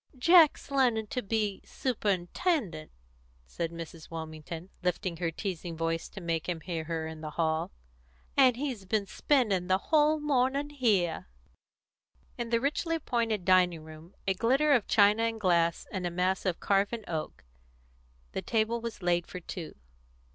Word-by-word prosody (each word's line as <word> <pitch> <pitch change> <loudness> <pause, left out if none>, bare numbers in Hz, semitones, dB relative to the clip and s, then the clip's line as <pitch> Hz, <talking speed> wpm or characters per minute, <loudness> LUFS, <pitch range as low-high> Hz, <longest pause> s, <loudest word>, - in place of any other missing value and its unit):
"Jack's 320 0 +5
learning 245 -5 +2
to 250 +4 -3
be 210 -2 -1
superintendent," 205 - -1 0.6
said 165 - -3
Mrs. 165 -1 -9
Wilmington, 160 +2 -7
lifting 180 0 -1
her 170 -1 -1
teasing 170 -1 -5
voice 165 0 -2
to 195 - -9
make 165 -1 -2
him 170 -2 -2
hear 165 -3 -4
her 165 -1 -3
in 160 -1 -7
the 155 - -5
hall, 160 0 0 0.7
"and 260 -3 +6
he's 255 -7 -3
been 205 +1 0
spending 200 -6 +1
the 185 0 +3
whole 305 +7 +3
morning 280 0 +1
here." 210 - +1 1.1
In 235 -1 -4
the 230 0 +2
richly 305 +5 0
appointed 230 - -1
dining 180 -3 +4
room 160 +3 -13
a 195 - +2
glitter 265 +9 +3
of 240 -6 +2
china 210 +1 +5
and 230 -1 -1
glass 170 -4 +2
and 185 -2 -2
a - - -1
mass 185 +2 0
of 180 - -1
carven 200 +3 +1
oak 160 -2 -4 0.9
the - - -3
table 230 +1 0
was 230 -4 -6
laid 175 -1 +1
for 180 - -7
two. 175 -1 -7
195 Hz, 155 wpm, -29 LUFS, 170-240 Hz, 1.1 s, and